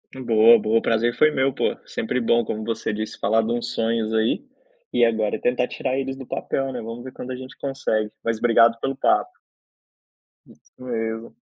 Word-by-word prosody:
Boa, 115 -2 +6
boa. 110 +1 +1
O - - -9
prazer 115 +1 +1
foi 155 - +5
meu, 135 -1 +1
poxa. - - 0
Sempre 125 +3 -2
bom, 115 +1 +3
como 110 0 -4
você 115 -1 -2
disse, 110 +1 -5
falar 110 +1 +2
de 110 +1 -2
uns 120 0 -2
sonhos 115 -1 0
aí, 110 - +1 0.5
e - - +3
agora 110 -2 +1
tentar 125 0 +1
tirar 130 - -2
eles 135 0 -3
do 135 0 -9
papel, 135 +2 -2
né. 125 - -5
Vamos 115 +2 -7
ver 130 - -8
quando 130 0 -8
a 130 - -3
gente 130 0 -10
consegue. 120 -6 -1
Mas 115 -1 0
obrigado 115 0 +4
pelo 135 +2 -2
papo. - - +2 1.2
Isso - - -22
mesmo. 115 -2 -4
115 Hz, 195 wpm, -23 LUFS, 110-130 Hz, 1.2 s, Boa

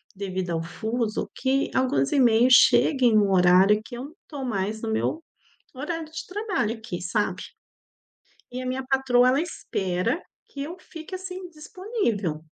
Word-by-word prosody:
devido 185 -2 -4
ao 165 - -1
fuso, 220 +6 -3
que 270 +1 0
alguns 195 - +1
e-mails 245 -2 +5
cheguem 245 -2 +5
no 205 -2 +4
horário 185 +3 +5
que 240 - -9
eu 250 - -6
não 295 - -12
tô 280 -4 -6
mais 215 -1 -2
no 225 - -3
meu 310 +8 -1 0.5
horário 315 +4 -4
de 320 - -7
trabalho 375 - -2
aqui, 220 -5 -6
sabe? 195 +4 -1 1.1
E 255 - -5
a 255 - -6
minha 255 +1 -2
patroa, 265 -2 +3
ela 265 +3 +3
espera 195 - -2 0.3
que 280 - -8
eu 325 +5 -6
fique, 325 +1 -11
assim, 370 -1 -7
disponível. 305 - -3
245 Hz, 155 wpm, -25 LUFS, 205-295 Hz, 1.1 s, e-mails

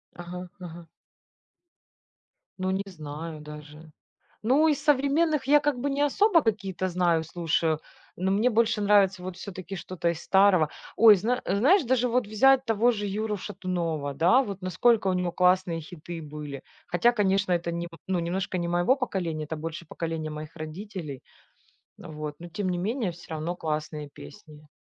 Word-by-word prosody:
Ага, 180 +1 -7
ага. 170 -2 -9 1.7
Ну, 185 0 -1
не 190 +1 -1
знаю 155 -2 -7
даже. 150 +1 -11 0.5
Ну, 280 +7 +4
из 295 -1 +1
современных 295 +1 +2
я 295 +1 +6
как 290 -2 0
бы 285 - -1
не 280 - -1
особо 335 +4 +4
какие-то 195 -5 -1
знаю, 170 -2 +2
слушаю, 160 -1 0 0.4
ну, 190 +2 0
мне 220 +5 +3
больше 225 -1 +2
нравится 200 -2 +4
вот 185 -1 -6
все-таки 185 -1 -7
что-то 175 -1 -2
из 170 -1 -2
старого. 190 -5 +4 0.3
Ой, 220 -1 +9
зна 230 +6 -1
знаешь, 275 - +4
даже 250 -1 +2
вот 250 0 +1
взять 265 +5 +4
того 230 +2 +3
же 205 -2 -3
Юру 210 +1 -2
Шатунова, 175 -7 -3
да, 180 - +5
вот 200 -3 -6
насколько 210 +4 +2
у 190 - +2
него 180 -1 -1
классные 180 -2 +2
хиты 165 +1 -8
были. 150 -2 -7 0.2
Хотя, 205 +8 +3
конечно, 195 -3 +1
это 170 0 -1
нем 170 0 -4 0.2
ну, 185 -2 0
немножко 180 +2 -2
не 170 -1 -2
моего 175 +9 +3
поколения, 175 - -3
это 160 +2 -5
больше 165 +2 -6
поколения 160 -2 -4
моих 155 +1 -8
родителей, 155 -3 -7 0.8
вот, 150 -3 -7
но 175 - -8
тем 185 +3 -3
не 180 - -1
менее, 210 0 -1
всё 170 0 -15
равно 160 +3 -3
классные 150 -2 -4
песни. 150 -6 -14
185 Hz, 160 wpm, -27 LUFS, 165-215 Hz, 1.7 s, Ой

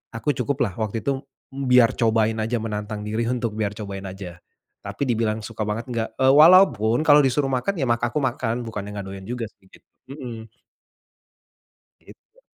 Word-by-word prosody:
aku 145 +6 0
cukuplah 125 -4 -1
waktu 110 +1 -3
itu 135 -1 -1 0.3
biar 125 -3 +4
cobain 110 -1 +2
saja 115 +2 -1
menantang 105 -1 -4
diri 115 +2 -1
untuk 120 -3 -2
biar 105 -2 -2
cobain 100 -2 -6
saja. 90 -3 -9 0.4
Tapi - - -4
dibilang 110 -1 0
suka 115 -1 -7
banget 115 +4 -3
nggak, 115 -1 -2
e 130 - +3
walaupun 150 - +6
kalau 145 0 +8
disuruh 135 +2 +1
makan 170 +10 -1
ya 135 - +1
mak 120 0 +1
aku 120 +5 -1
makan 120 -2 -2
bukannya 105 -2 -6
enggak 100 - -5
doyan 95 0 -8
juga 120 -2 -3
sih, 95 - -28
gitu. - - -21 0.2
Mhm. 115 -6 -8 1.5
Gitu. 465 +3 -20
115 Hz, 170 wpm, -23 LUFS, 105-130 Hz, 1.5 s, kalau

